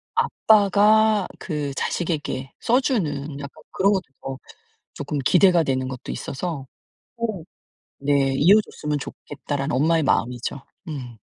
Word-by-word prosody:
아빠가 210 0 +4
그 150 -5 -3
자식에게 150 -6 -2
써 250 +3 +2
주는 150 - -2
약간 140 -1 -10
그런 200 +2 +3
것도 190 - 0 0.2
더 135 -1 -5 0.6
조금 145 0 -4
기대가 175 +5 +4
되는 130 -3 -1
것도 130 -2 -6
있어서. 145 -2 -5 0.5
어 220 -8 -3 0.6
네 135 -2 +3
'이어 185 +9 +6
줬으면 150 -7 -4
좋겠다.'라는 140 -1 -5
엄마의 160 +4 +3
마음이죠. 125 0 -1 0.3
음. 125 -6 -6
150 Hz, 265 characters per minute, -23 LUFS, 135-195 Hz, 0.6 s, 이어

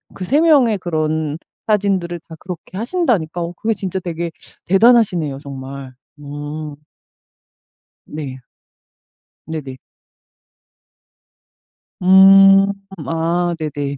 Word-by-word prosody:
그 185 - -5
3 285 - +2
명의 275 -10 +4
그런 155 -3 -2 0.3
사진들을 195 -5 0
다 160 - -9
그렇게 180 0 -9
하신다니까 225 - -1
어 170 +1 -4
그게 225 +1 0
진짜 190 -2 -4
되게 170 -1 -4 0.3
대단하시네요, 195 - +3
정말. 135 -1 -8 0.3
음. 145 +1 -7 1.3
네. 140 -4 -7 1.1
네네. 150 -5 -6 2.3
음 195 +1 +7 0.4
아 170 +2 0
네네. 145 -2 -4
170 Hz, 175 characters per minute, -18 LUFS, 150-195 Hz, 2.3 s, 음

